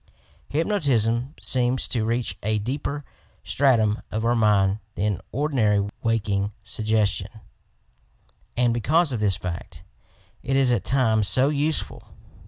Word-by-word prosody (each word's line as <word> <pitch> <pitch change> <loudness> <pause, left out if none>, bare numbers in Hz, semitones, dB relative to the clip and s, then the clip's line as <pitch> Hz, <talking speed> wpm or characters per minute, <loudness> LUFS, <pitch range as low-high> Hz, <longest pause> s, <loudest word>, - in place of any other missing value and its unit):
Hypnotism 140 - 0
seems 125 0 +2
to 115 -3 0
reach 115 -4 -2
a 110 +1 0
deeper 140 +6 -4 0.4
stratum 115 -6 +1
of 110 +1 -3
our 120 +1 +2
mind 105 -2 +2 0.2
than 100 +1 -1
ordinary 110 -8 +1
waking 105 -3 -1
sug 110 - -5
gestion, 110 0 0 1.2
and 120 -1 +2
because 155 +7 +2
of 120 - -3
this 100 -3 +1
fact 90 -2 -7 0.6
it 135 - -2
is 135 -2 +3
at 120 -5 0
times 110 -6 +2
so 130 +6 +7
useful. 150 +1 -2
115 Hz, 125 wpm, -23 LUFS, 105-135 Hz, 1.2 s, so